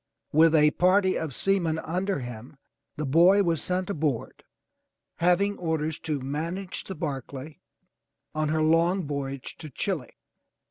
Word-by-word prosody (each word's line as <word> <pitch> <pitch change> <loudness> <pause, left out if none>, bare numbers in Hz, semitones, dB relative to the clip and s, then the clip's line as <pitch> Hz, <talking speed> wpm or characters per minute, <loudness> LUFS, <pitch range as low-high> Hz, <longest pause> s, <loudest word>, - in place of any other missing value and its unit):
With 160 +1 +5
a 150 -1 +5
party 185 +2 +3
of 160 -3 -3
seamen 170 +1 +1
under 180 +1 -2
him, 120 +3 -9 0.4
the 150 - -2
boy 175 +8 +5
was 165 -4 0
sent 185 0 -1
aboard, 150 - -2 0.7
having 180 +4 +2
orders 160 -2 -1
to 150 -3 -2
manage 165 +8 -4
the 190 - -6
Barclay 145 -1 -5 0.7
on 155 -1 0
her 155 0 +1
long 165 +3 +3
voyage 140 -2 -5
to 155 - -8
Chile. 155 -1 -4
160 Hz, 135 wpm, -27 LUFS, 145-180 Hz, 0.7 s, With